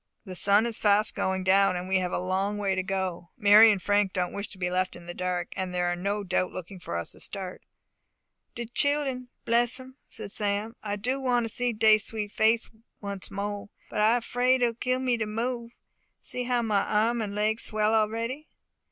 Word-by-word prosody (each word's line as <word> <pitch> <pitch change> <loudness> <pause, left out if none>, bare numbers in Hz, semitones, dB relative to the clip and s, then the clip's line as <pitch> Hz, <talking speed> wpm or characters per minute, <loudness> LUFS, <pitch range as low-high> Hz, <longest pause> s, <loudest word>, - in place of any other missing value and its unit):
The 190 - -7
sun 200 +4 +4
is 235 -2 -4
fast 210 0 +3
going 190 0 -1
down, 195 0 +4
and 180 +1 -4
we 190 0 +2
have 180 -1 -2
a - - 0
long 190 +3 -1
way 200 -2 0
to 190 - 0
go. 185 -3 -3
Mary 210 0 +8
and 205 -2 +2
Frank 205 0 +1
don't 180 -2 -1
wish 200 +1 -4
to 195 - -14
be 180 -1 -2
left 185 0 0
in 175 - -12
the 175 - -6
dark, 180 -1 -2
and 185 -1 -3
are 175 0 +1
no 200 +3 -2
doubt 185 -1 0
looking 185 +1 -8
for 85 - -6
us 85 - -5
to - - -12
start." 190 -2 -6 0.9
"De 235 - -4
childun! 265 +1 0 0.2
Bless 240 +2 +3
'em!" 260 +1 -12
said - - -8
Sam. 210 +2 -1
"I 205 -1 -2
do 250 +7 -1
want 245 -3 +1
to 220 - -7
see 245 -1 0
dey 215 -1 +5
sweet 210 0 -3
face 225 +2 +3 0.3
once 200 -2 -5
mo 205 +1 -4
'e. - - -21 0.2
But - - -1
I 230 +3 +4
'fraid 250 +2 +2
it - - +6
will 235 - 0
kill 255 +2 -1
me 250 -2 +1
to 220 -2 -2
move. 235 +2 -3 0.5
See 250 0 -3
how 245 -1 +1
my 210 -3 +2
arm 225 +3 +1
and 205 -2 -4
leg 215 +2 +1
swell 215 0 0
a'ready." 230 +7 0
210 Hz, 215 wpm, -27 LUFS, 190-235 Hz, 0.9 s, Mary